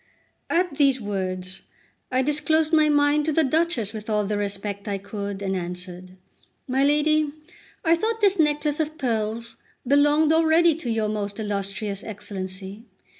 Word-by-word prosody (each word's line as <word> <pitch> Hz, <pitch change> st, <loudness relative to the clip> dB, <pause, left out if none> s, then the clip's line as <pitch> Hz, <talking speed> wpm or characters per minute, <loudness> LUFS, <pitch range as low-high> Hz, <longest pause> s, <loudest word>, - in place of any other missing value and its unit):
At 345 Hz, -4 st, 0 dB
these 275 Hz, -3 st, +4 dB
words 190 Hz, -3 st, -3 dB, 0.5 s
I 255 Hz, +1 st, +2 dB
disclosed 305 Hz, +2 st, +1 dB
my 310 Hz, -1 st, +5 dB
mind 290 Hz, 0 st, +3 dB
to 315 Hz, -, +1 dB
the 320 Hz, +2 st, +3 dB
Duchess 275 Hz, -, 0 dB
with 215 Hz, 0 st, -7 dB
all 210 Hz, -1 st, +1 dB
the 210 Hz, +1 st, -1 dB
respect 200 Hz, 0 st, -2 dB
I 200 Hz, -1 st, -1 dB
could, 200 Hz, 0 st, -6 dB
and 190 Hz, 0 st, -1 dB
answered: 180 Hz, +1 st, -6 dB, 0.5 s
"My 265 Hz, +1 st, +1 dB
lady, 300 Hz, +1 st, +3 dB, 0.6 s
I 330 Hz, +1 st, +5 dB
thought 445 Hz, +6 st, -1 dB
this 400 Hz, -3 st, +3 dB
necklace 295 Hz, -1 st, +1 dB
of 315 Hz, 0 st, -2 dB
pearls 230 Hz, -3 st, -2 dB, 0.3 s
belonged 295 Hz, +3 st, +4 dB
already 325 Hz, +1 st, +4 dB
to 300 Hz, -5 st, -6 dB
your 220 Hz, -2 st, 0 dB
most 205 Hz, 0 st, -3 dB
illus 200 Hz, -2 st, -2 dB
trious 200 Hz, -1 st, -4 dB
Excellency. 200 Hz, 0 st, -6 dB
235 Hz, 155 wpm, -24 LUFS, 200-300 Hz, 0.6 s, my